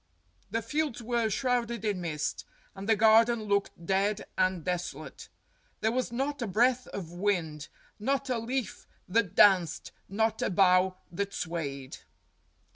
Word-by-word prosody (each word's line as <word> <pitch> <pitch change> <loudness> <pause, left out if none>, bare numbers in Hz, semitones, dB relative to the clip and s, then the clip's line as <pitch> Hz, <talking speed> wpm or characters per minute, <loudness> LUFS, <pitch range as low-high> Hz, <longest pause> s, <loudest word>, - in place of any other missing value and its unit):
The 230 0 -2
fields 285 -1 -2
were 235 -1 0
shrouded 235 -1 -1
in 200 -4 -1
mist, 155 -3 -3 0.3
and 200 +2 -7
the 220 - +6
garden 225 +1 +5
looked 200 -4 -1
dead 195 +3 0
and 185 -3 0
des 180 -1 +1 0.2
olate. - - -10 0.5
There 220 - +2
was 250 0 -1
not 275 +3 -2
a 235 - -1
breath 245 +5 +2
of 175 -4 -7
wind, 175 -6 -1 0.3
not 275 +5 0
a 250 -3 0
leaf 245 +1 -4 0.2
that 200 -1 +1
danced, 180 -6 +4 0.2
not 220 +2 0
a - - +1
bough 185 0 +4
that 200 +3 -3
swayed. 140 -6 -4
205 Hz, 145 wpm, -29 LUFS, 180-235 Hz, 0.5 s, the